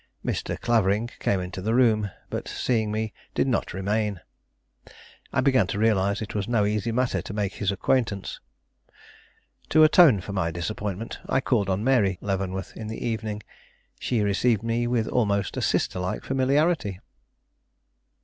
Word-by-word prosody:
Mr. - - -2
Clavering 110 -2 +2
came 100 - +1
into 90 +1 -5
the 110 +4 0
room, 110 -5 +3 0.2
but, - - -4
seeing 110 -4 0
me, 110 0 -2 0.2
did - - +2
not 125 - 0
remain. 100 0 -1 1.1
I - - +1
began 130 -7 +3
to 100 - -3
realize 100 -1 +2
it 105 - -7
was 105 -1 -2
no 115 -4 +2
easy 105 +2 0
matter 120 -6 0
to 95 - -7
make 100 -2 -1
his 100 -2 -1
acquaintance. 100 0 -1 1.3
To 155 +1 +6
atone 155 - +7
for 100 +2 -7
my 95 -4 0
disappointment, 100 +5 -4
I - - +2
called 120 -7 +1
on 95 +2 0
Mary 110 -8 +3
Leavenworth 95 -1 -3
in 110 - -6
the 110 - -5
evening. 110 -2 -3 0.6
She 120 -4 0
received 105 +2 +2
me 115 +1 0
with 120 -2 0
almost 100 -5 0
a - - -2
sister - - 0
like 90 +1 -3
familiarity. 135 - +1
105 Hz, 155 wpm, -25 LUFS, 100-120 Hz, 1.3 s, atone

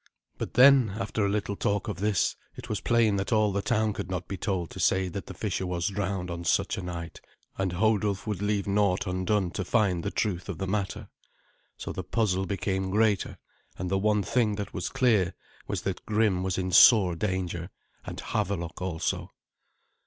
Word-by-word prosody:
But - - -5
then, 125 -5 +6
after 110 - -1
a 100 - +2
little 100 0 -1
talk 100 0 -1
of - - -4
this, 105 -3 +1 0.2
it - - -10
was - - -2
plain 115 -4 +3
that 100 +3 -2
all 110 -2 +3
the 100 +1 -1
town 110 -2 +1
could 90 - -5
not 90 -1 -3
be 100 - -4
told 95 -3 -2
to - - -9
say 95 -1 +2
that 90 -1 -6
the - - -7
fisher 95 - -2
was 90 +1 -1
drowned 95 -3 -3
on 85 0 -5
such 85 - +1
a - - -4
night, 85 -2 -6 0.3
and 95 -2 -1
Hodulf 105 0 +1
would 105 -3 -3
leave 105 -1 0
naught 100 -2 +1
undone 95 0 0
to 95 - -3
find 95 -3 +1
the - - -1
truth 95 -3 -2
of 95 - -4
the 95 - -3
matter. 95 0 -3 0.7
So - - -5
the 95 - -4
puzzle 95 -1 0
became 95 -1 -1
greater, 105 0 +1 0.4
and 90 -1 -4
the 95 - +2
one 105 0 +2
thing 115 -2 +1
that 100 -1 -5
was 95 - -3
clear 105 -9 +2 0.3
was - - -3
that - - -3
Grim 105 -4 +2
was 95 -1 -1
in 95 -1 -2
sore 95 -1 +7
danger, 90 -2 -2 0.3
and - - -7
Havelok 90 -5 -3
also. 90 -3 -2
100 Hz, 195 wpm, -28 LUFS, 90-105 Hz, 0.7 s, sore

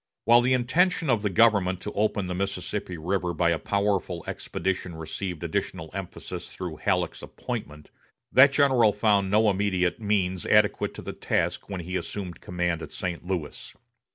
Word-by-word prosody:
While 120 +1 +7
the 125 +1 +2
intention 160 +5 +2
of 115 -4 +2
the 105 - 0
government 100 -3 +3
to - - -5
open 105 -1 0
the 90 - -3
Mississippi 95 0 -3
River 90 +2 -1
by 85 -1 +2
a 80 - 0
powerful 100 -4 -1
expedition 95 -2 -3
received 85 +2 -5
additional 80 - -3
emphasis 95 -2 -7
through 90 -4 -6
Halleck's 90 -2 -1
appointment, 75 0 -7 0.4
that 135 +2 +7
general 130 -7 +4
found 105 -2 +2
no 110 +2 +4
immediate 95 -1 +1
means 95 -4 0
adequate - - +3
to - - -8
the - - -5
task - - -1
when 95 -3 -4
he 90 +2 -5
assumed 90 -5 -6
command 90 -2 -2
at - - -8
St. 85 -2 -4
Louis. 90 -5 -5
95 Hz, 160 wpm, -26 LUFS, 90-105 Hz, 0.4 s, While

